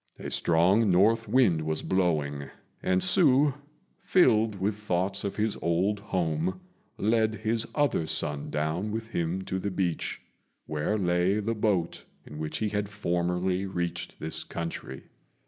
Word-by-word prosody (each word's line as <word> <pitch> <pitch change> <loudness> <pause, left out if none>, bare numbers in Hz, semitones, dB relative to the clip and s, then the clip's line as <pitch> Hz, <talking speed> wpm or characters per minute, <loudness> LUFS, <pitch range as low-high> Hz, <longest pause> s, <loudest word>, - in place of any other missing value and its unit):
A - - -6
strong 95 +6 +3
north 110 +6 +3
wind 105 -12 +3
was 80 0 -2
blowing, 75 -7 0 0.3
and 95 0 +1
Hsü, 145 -5 +4 0.5
filled 115 - +3
with 100 +3 0
thoughts 95 -1 -1
of 100 - -3
his 110 0 0
old 95 +5 +1
home, 90 -2 -1 0.4
led 110 +1 +1
his 110 +2 -1
other 145 - +1
son 75 -1 +1
down 80 +7 -1
with 110 +1 -4
him 85 -1 -2
to 95 0 -3
the 100 - -2
beach, 90 -3 -2 0.5
where 75 +8 -1
lay 90 +1 +1
the 110 +2 -1
boat 105 -6 -1 0.2
in 75 - -9
which 75 -1 -3
he 110 - -1
had 105 -1 -2
formerly 90 -1 -1
reached 85 -2 -4
this 80 - -2
country. 85 -5 -6
95 Hz, 145 wpm, -28 LUFS, 85-105 Hz, 0.5 s, Hsü